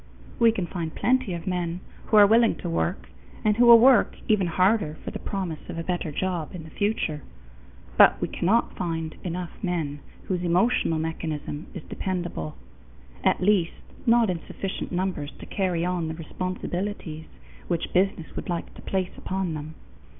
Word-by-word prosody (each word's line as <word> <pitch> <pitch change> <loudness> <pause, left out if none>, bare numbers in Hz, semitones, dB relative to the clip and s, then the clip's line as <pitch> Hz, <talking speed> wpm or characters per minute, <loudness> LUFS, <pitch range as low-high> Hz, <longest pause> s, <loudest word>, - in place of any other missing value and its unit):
We 230 -1 +6
can 195 -5 -2
find 170 -3 -5
plenty 255 0 +2
of 170 - -7
men 180 -2 -2 0.3
who 215 - +4
are 205 - +10
willing 225 +2 +5
to - - -6
work, 170 +3 -2 0.3
and 210 -1 +4
who 240 +2 +5
will 235 -1 +11
work 245 -1 +5
even 205 -4 +3
harder 185 -2 +2
for - - -3
the - - -6
promise 180 -6 -4
of 175 - -5
a 165 - -2
better 175 -3 -2
job 175 0 -2
in 170 - -7
the 160 - -12
future. 205 -7 -1 0.8
But - - +8
we - - -1
cannot 220 +7 +1
find 165 -3 -3
enough 180 -1 -4
men 165 -6 -2 0.2
whose 180 -2 -2
emotional 175 0 +2
mechanism 160 -1 -4
is - - -6
dependable 175 - -4 0.7
at - - +2
least 185 -3 +3 0.3
not 230 -3 +5
in 175 - -3
sufficient 195 -1 -5
numbers 180 -5 -2
to - - -10
carry 180 -4 -1
on 180 -2 -1
the 160 - -4
responsibilities 180 0 -4 0.4
which 170 -2 -2
business 185 -3 +1
would - - -5
like 170 -1 -3
to - - -12
place 190 -2 -2
upon 190 -3 -2
them. 155 +1 -6
180 Hz, 170 wpm, -26 LUFS, 165-195 Hz, 0.8 s, will